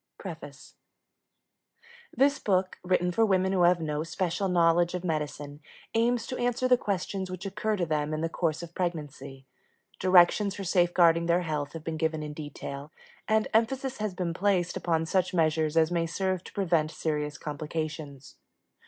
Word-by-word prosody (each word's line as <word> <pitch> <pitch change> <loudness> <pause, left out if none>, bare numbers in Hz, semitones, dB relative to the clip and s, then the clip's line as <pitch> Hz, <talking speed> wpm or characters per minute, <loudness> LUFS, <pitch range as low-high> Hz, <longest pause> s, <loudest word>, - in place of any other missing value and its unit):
PREFACE - - -9 1.4
This 280 +3 +2
book, 185 -2 0
written 180 -1 +1
for 225 +6 +2
women 190 -3 +2
who 190 -2 +1
have 175 0 +5
no 150 -2 -2
special 175 +3 -2
knowledge 175 0 +3
of 180 - -4
medicine, 150 -3 -3 0.3
aims 230 +1 +1
to 255 - -5
answer 245 +1 +1
the 255 - +6
questions 195 -3 -3
which 185 +1 -6
occur 210 +2 -1
to 180 -4 -1
them 150 -1 -1
in 155 0 -2
the 165 - +1
course 165 -1 -2
of 170 0 -9
pregnancy. 150 -6 -5 0.5
Directions 185 +2 +5
for 200 - -5
safeguarding 175 -2 +3
their 170 +1 +3
health 150 -4 -3
have 165 -2 -7
been 160 -1 -4
given 160 -1 -1
in 150 0 -6
detail, 145 -1 -7 0.4
and 220 0 +2
emphasis 260 +4 +1
has 210 -3 -2
been 175 -2 -2
placed 180 -1 +1
upon 165 -2 0
such 185 +2 0
measures 160 -1 +1
as 160 +1 +4
may 170 -1 0
serve 185 +1 -2
to - - -10
prevent 170 -6 +1
serious 150 -2 -3
complications. 150 -2 -6
175 Hz, 165 wpm, -28 LUFS, 155-190 Hz, 1.4 s, the